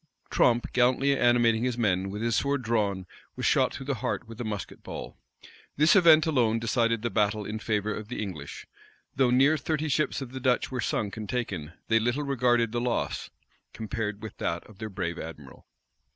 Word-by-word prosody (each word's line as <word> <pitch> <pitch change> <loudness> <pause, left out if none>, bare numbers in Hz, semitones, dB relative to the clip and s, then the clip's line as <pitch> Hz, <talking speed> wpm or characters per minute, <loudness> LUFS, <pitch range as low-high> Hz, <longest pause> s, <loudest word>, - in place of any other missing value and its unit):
Tromp, 120 -1 +3
gallantly 130 +3 +3
animating 120 -2 +3
his 125 -1 -1
men, 95 -4 +1
with 105 +3 -5
his 115 -1 +1
sword 140 +2 0
drawn, 105 -5 0 0.3
was - - -3
shot - - +3
through 135 - -7
the 140 - 0
heart 125 -2 -2
with 115 +1 -8
a - - -2
musket 105 -4 -5
ball. - - -7 0.6
This 155 +6 +5
event 165 -5 +7
alone 120 -8 +2
decided 115 0 0
the 120 - -1
battle 105 -1 +1
in 110 +2 -4
favor 105 -1 -1
of 105 0 -6
the 125 - -5
English. 85 -9 -6 0.5
Though 130 -2 +3
near 135 +5 +4
thirty 155 +1 -2
ships 150 +2 0
of 135 -3 -7
the 130 - -6
Dutch 130 0 +1
were 125 -1 -2
sunk 105 -1 -2
and 110 -2 -6
taken, 95 -11 -3
they 115 0 +4
little 120 +6 0
regarded 120 -4 +2
this 120 0 -1
loss 120 -1 -2 0.4
compared 110 -1 -4
with 110 - -7
that 85 - -2
of 105 -2 -17
their 110 0 -5
brave 90 -4 -4
admiral. 75 -4 -10
115 Hz, 195 wpm, -27 LUFS, 105-125 Hz, 0.6 s, event